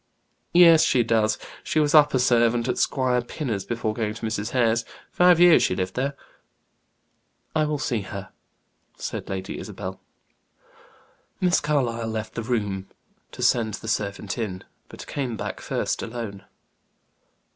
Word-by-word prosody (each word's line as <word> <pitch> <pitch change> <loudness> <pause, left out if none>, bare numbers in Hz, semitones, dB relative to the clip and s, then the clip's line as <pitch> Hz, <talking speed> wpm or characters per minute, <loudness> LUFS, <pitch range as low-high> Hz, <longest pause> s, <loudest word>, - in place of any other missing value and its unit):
"Yes 165 -2 +8
she 125 - +3
does. 110 -2 +2 0.3
She 155 - 0
was 150 -1 +2
upper 150 -3 +6
servant 120 -1 +3
at 125 - -1
Squire 125 -2 +1
Pinner's 120 -5 -4
before 115 -2 -2
going 110 -1 -2
to 115 - -6
Mrs. 110 0 -2
Hare's. 115 -2 +2 0.3
Five 180 -1 +5
years 175 -2 +7
she 90 - +1
lived 95 0 -2
there." 140 +2 -2 1.4
"I 155 -1 +3
will 150 0 -1
see 120 -5 -1
her," 95 -1 -8 0.7
said - - -5
Lady 95 0 -4
Isabel. - - -7 1.4
Miss 180 -1 +3
Carlyle 120 -6 0
left 110 -1 -4
the 115 - -3
room 105 -5 -2 0.4
to - - -6
send 110 -3 +2
the - - -10
servant 100 0 -2
in, 95 -5 -4 0.3
but - - -10
came 125 -5 -3
back - - -5
first - - -2
alone. 110 -4 -6
115 Hz, 145 wpm, -24 LUFS, 110-135 Hz, 1.4 s, Yes